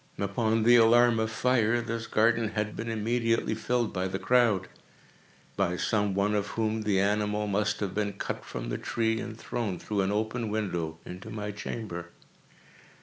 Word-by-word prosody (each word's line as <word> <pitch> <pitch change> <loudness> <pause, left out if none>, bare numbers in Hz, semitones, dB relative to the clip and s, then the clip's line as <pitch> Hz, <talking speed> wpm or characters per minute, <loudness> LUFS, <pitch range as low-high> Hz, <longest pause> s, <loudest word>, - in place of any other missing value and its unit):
Upon 110 +3 0
the 120 +2 +7
alarm 120 0 +5
of 110 0 0
fire, 120 0 +2
this 115 0 -4
garden 115 +1 +3
had 105 0 -1
been 115 +1 -4
immediately 115 +1 0
filled 120 +1 -1
by 95 -1 -1
the 95 +1 -3
crowd—by 100 -4 -1
some 105 -1 0
one 100 +1 +1
of 105 -1 0
whom 110 0 -1
the 105 -3 +1
animal 105 +1 +1
must 105 +1 0
have 100 -3 -2
been 100 0 -1
cut 100 - -4
from - - -6
the - - -3
tree 115 -1 0
and 110 -2 -6
thrown, 115 -6 -3
through 105 -2 -2
an 95 +1 0
open 110 +2 -1
window, 90 -7 -2
into 90 +1 -8
my 105 -1 -4
chamber. 100 -4 -6
110 Hz, 165 wpm, -28 LUFS, 100-115 Hz, -, the